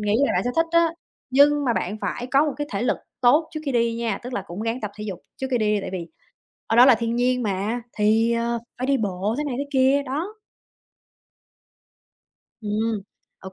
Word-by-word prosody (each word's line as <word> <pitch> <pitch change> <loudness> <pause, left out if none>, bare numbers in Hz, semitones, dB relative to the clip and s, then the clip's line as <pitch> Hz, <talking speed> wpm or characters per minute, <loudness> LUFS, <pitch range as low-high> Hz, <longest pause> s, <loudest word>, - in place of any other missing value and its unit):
nghĩ 210 0 0
là - - 0
bạn - - +1
sẽ 245 - 0
thích 330 - +3
đó, 335 -1 +4 0.4
nhưng 290 +2 +5
mà 245 - +2
bạn 210 -1 -2
phải 245 - -3
có 275 +3 +3
một 295 - -1
cái 290 - -3
thể 200 - -1
lực 245 - +1 0.2
tốt 290 +6 +4
trước 310 - -3
khi 275 - -1
đi 235 -1 +2
nha. 230 -3 -2
Tức 250 +1 -7
là 200 - -2
cũng 180 +5 -6
ráng 230 +3 -2
tập 210 - -4
thể 210 - -6
dục 195 -4 -5 0.2
trước 265 - -3
khi 245 - +2
đi 210 -1 +2
đi, 205 - 0
tại - - -6
vì 175 -3 -4 0.6
ở 225 - 0
đó 245 +2 +9
là 260 - +8
thiên 230 +1 -2
nhiên 250 0 +1
mà, 210 +4 -1
thì, 220 +2 +2
ờ, 235 0 0 0.2
phải 255 - -2
đi 275 0 +3
bộ 205 -1 -1
thế 300 - -1
này 280 -4 -3
thế 285 - -1
kia, 270 +1 +3
đó. 310 +10 -4 2.3
Ừm, 215 0 -1 0.4
OK, 190 0 -10
235 Hz, 225 wpm, -23 LUFS, 210-270 Hz, 2.3 s, đó